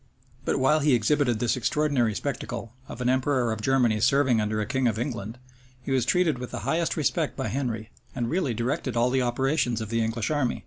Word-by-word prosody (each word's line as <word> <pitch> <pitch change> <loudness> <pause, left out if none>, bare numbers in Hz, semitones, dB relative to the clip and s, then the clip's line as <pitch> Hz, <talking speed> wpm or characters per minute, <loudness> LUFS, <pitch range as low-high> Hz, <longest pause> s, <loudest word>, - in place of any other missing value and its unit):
But - - +1
while 140 +4 +3
he 145 -3 +4
exhibited 120 +1 +2
this 120 +1 +1
extraordinary 125 -3 +1
spectacle, 120 -3 -4
of 125 - -8
an 125 - 0
emperor 130 -2 +1
of 110 - -6
Germany 120 -3 +2
serving 130 -3 +3
under 105 0 -1
a 105 - -1
king 130 +2 0
of 110 -2 0
England, 115 -2 -4 0.4
he 130 +2 -6
was 130 -3 +2
treated 160 -2 +2
with 125 - -6
the - - -5
highest 165 +1 0
respect 155 0 0
by 135 - -2
Henry, 115 -4 -3 0.2
and 120 - -1
really 155 -5 0
directed 120 +1 -2
all 120 +2 +3
the 130 0 +2
operations 125 0 0
of 110 -2 -5
the 115 0 0
English 110 +4 -2
army. 145 -5 0
125 Hz, 210 wpm, -26 LUFS, 115-140 Hz, 0.4 s, he